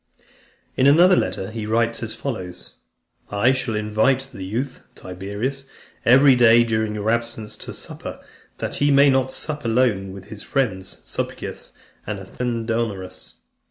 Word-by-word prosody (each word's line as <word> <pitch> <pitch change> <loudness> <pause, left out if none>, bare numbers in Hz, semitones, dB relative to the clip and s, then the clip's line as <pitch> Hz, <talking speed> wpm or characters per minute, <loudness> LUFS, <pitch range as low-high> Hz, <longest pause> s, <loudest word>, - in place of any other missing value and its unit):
In 130 - +4
another 175 +6 +7
letter, 95 - -1
he 110 -1 -5
writes 115 +1 +1
as 110 -1 -3
follows: 95 -10 -6 0.6
"I 105 +5 +3
shall 130 -4 -1
invite: 110 +6 +1
the 95 - -7
youth, 125 +8 -4
Tiberius, 100 +9 -5 0.4
every 135 +2 +7
day 120 -1 +6
during 110 -2 -1
your 105 +1 0
absence, 115 -2 -2
to - - -8
supper, - - -7 0.4
that - - -3
he 145 - +3
may 140 0 +6
not 130 0 +2
sup 150 +1 -5
alone 115 -5 +1
with 95 +1 -11
his 105 -2 -8
friends 100 -9 -2
Sulpicius - - -5 0.3
and 105 0 -3
Athenodorus. 115 -2 -3
115 Hz, 140 wpm, -22 LUFS, 105-130 Hz, 0.6 s, another